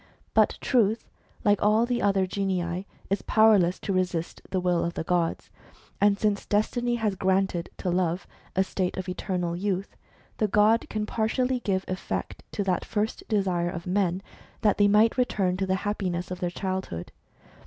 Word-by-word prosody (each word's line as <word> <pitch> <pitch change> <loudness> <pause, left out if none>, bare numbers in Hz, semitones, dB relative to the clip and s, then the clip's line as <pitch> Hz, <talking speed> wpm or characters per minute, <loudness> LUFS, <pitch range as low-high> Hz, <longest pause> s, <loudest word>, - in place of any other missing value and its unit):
But - - +3
Truth, 225 -3 +1 0.3
like 205 -1 +4
all 215 +3 +4
the 240 0 -1
other 195 -1 +3
genii, 185 -1 -2 0.2
is 195 - +1
powerless 210 -5 +4
to 200 - -2
resist 180 -3 -1
the 190 - 0
will 180 -1 +1
of 170 0 -3
the - - -2
gods. 170 -1 -1 0.5
And, 205 0 +4
since 205 -1 0
destiny 240 +3 +1
has 220 -3 0
granted 190 -2 0
to 180 - -2
Love 175 0 0 0.3
a 190 - +4
state 185 -1 -2
of 185 0 -4
eternal 180 -1 -2
youth, 195 +1 -2 0.4
the 215 - +3
god 210 +3 +3
can 215 -1 -2
partially 250 +4 0
give 190 -4 -1
effect 185 0 -4
to 205 - -1
that 185 -2 0
first 215 +1 -2
desire 185 -5 +1
of 170 -1 -6
men, 185 0 0 0.4
that 210 -2 +2
they 205 - +6
might 215 +5 +4
return 195 -7 +1
to 190 0 -1
the 190 - +2
happiness 185 -3 -2
of 180 - -4
their 175 - -1
childhood. 185 - -4
195 Hz, 170 wpm, -27 LUFS, 180-210 Hz, 0.5 s, they